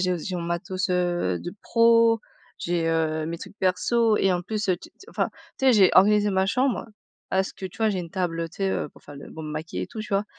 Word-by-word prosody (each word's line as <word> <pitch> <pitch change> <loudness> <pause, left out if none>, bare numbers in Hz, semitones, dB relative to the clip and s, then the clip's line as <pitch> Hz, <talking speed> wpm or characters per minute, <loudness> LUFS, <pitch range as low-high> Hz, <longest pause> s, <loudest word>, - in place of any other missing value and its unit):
j'ai 180 -1 +1
j'ai 185 - -4
mon 170 - -3
matos, 185 +3 -2
heu, 175 - 0
de 175 - -7
pro, 230 -1 +4 0.4
j'ai, 170 -1 -1
heu, 160 -1 0
mes 165 0 -4
trucs 205 - -11
perso 220 +4 +2
et 195 - +3
en 180 0 -1
plus 215 +2 -3
te 190 - +2
tu 175 - -7
t - - -50
enfin, - - -1 0.3
tu 265 - +1
sais 260 - +7
j'ai 200 -5 +6
organisé 210 +1 +5
ma 190 0 +2
chambre 255 +4 0 0.4
parce 190 0 0
que 190 - -6
tu 185 - -13
vois 220 -1 +3
j'ai 190 -3 -2
une 170 -2 -8
table, 175 -3 -2
heu, 165 - -2
tu 170 - -18
sais, 195 -1 0
heu, - - -2
pour - - -20
faire 145 - -12
le - - -11
pour 160 -1 -7
me 150 - -5
maquiller 155 +2 -4
et - - -4
tout 225 - -7
tu 215 - -7
vois? 200 +1 +2
185 Hz, 265 wpm, -25 LUFS, 170-210 Hz, 0.4 s, sais